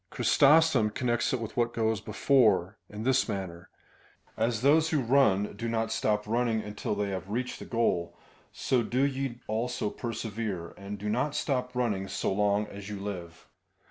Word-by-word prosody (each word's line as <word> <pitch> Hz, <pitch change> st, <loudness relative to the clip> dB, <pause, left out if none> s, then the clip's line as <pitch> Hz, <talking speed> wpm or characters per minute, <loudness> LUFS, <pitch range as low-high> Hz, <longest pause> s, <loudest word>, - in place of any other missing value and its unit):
Chrysostom 145 Hz, -6 st, +4 dB
connects 120 Hz, +1 st, 0 dB
it 130 Hz, -, 0 dB
with 115 Hz, -2 st, -6 dB
what 120 Hz, 0 st, 0 dB
goes 110 Hz, -2 st, 0 dB
before, 110 Hz, -8 st, +2 dB
in 105 Hz, +1 st, -7 dB
this 130 Hz, 0 st, +2 dB
manner: 95 Hz, -3 st, -5 dB, 0.7 s
as 115 Hz, 0 st, 0 dB
those 155 Hz, +4 st, +4 dB
who 155 Hz, -, +1 dB
run 115 Hz, -6 st, +2 dB
do 115 Hz, +3 st, -4 dB
not 115 Hz, 0 st, -1 dB
stop 105 Hz, 0 st, 0 dB
running 115 Hz, 0 st, +1 dB
until 105 Hz, -1 st, -4 dB
they 100 Hz, -1 st, -1 dB
have 95 Hz, 0 st, -5 dB
reached 125 Hz, +4 st, -3 dB
the -, -, -8 dB
goal, 110 Hz, -8 st, 0 dB, 0.3 s
so 130 Hz, -2 st, 0 dB
do 125 Hz, +4 st, 0 dB
ye 135 Hz, -3 st, -2 dB
also 115 Hz, 0 st, -2 dB
persevere, 110 Hz, -6 st, -4 dB
and 100 Hz, +1 st, -7 dB
do 105 Hz, +2 st, -6 dB
not 125 Hz, +7 st, 0 dB
stop 125 Hz, -2 st, -1 dB
running 105 Hz, -6 st, -1 dB
so -, -, -1 dB
long 105 Hz, +1 st, +2 dB
as 100 Hz, -1 st, -9 dB
you 105 Hz, -1 st, -5 dB
live. 90 Hz, -5 st, -7 dB
110 Hz, 170 wpm, -29 LUFS, 100-125 Hz, 0.7 s, Chrysostom